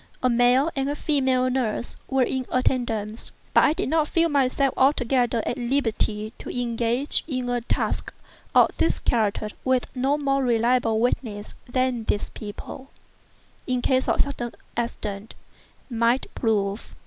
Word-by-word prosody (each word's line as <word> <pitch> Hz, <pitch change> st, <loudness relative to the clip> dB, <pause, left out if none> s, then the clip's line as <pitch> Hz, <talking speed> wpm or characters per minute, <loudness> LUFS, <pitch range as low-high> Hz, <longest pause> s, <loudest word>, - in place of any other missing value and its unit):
A 255 Hz, -, +4 dB
male 245 Hz, +6 st, +4 dB
and 270 Hz, 0 st, 0 dB
a 290 Hz, -, -1 dB
female 265 Hz, -4 st, +1 dB
nurse 250 Hz, -2 st, -1 dB
were 265 Hz, -1 st, +3 dB
in 260 Hz, 0 st, -2 dB
attendance; 230 Hz, -4 st, -1 dB, 0.2 s
but -, -, +6 dB
I 300 Hz, -, +4 dB
did -, -, -2 dB
not 315 Hz, 0 st, +2 dB
feel 335 Hz, +1 st, +2 dB
myself 275 Hz, -1 st, +2 dB
altogether 245 Hz, -3 st, +2 dB
at 245 Hz, -, -2 dB
liberty 225 Hz, -4 st, -1 dB
to -, -, -8 dB
engage 240 Hz, +2 st, 0 dB
in 255 Hz, -5 st, -2 dB
a 245 Hz, 0 st, 0 dB
task 230 Hz, -, -1 dB, 0.4 s
of -, -, +6 dB
this 330 Hz, -, +2 dB
character 215 Hz, -2 st, 0 dB
with 260 Hz, -1 st, +2 dB
no 270 Hz, +3 st, +1 dB
more 275 Hz, -2 st, +1 dB
reliable 235 Hz, -1 st, +2 dB
witnesses 220 Hz, -3 st, -1 dB, 0.2 s
than 255 Hz, -2 st, 0 dB
these 205 Hz, -, -1 dB
people, 220 Hz, +5 st, -8 dB, 0.8 s
in 250 Hz, -2 st, 0 dB
case 260 Hz, -1 st, +2 dB
of -, -, +3 dB
sudden 245 Hz, -4 st, -4 dB, 0.2 s
accident, 215 Hz, -3 st, -4 dB, 0.5 s
might 235 Hz, +1 st, +1 dB
prove. 205 Hz, -2 st, -1 dB
250 Hz, 145 wpm, -24 LUFS, 230-265 Hz, 0.8 s, but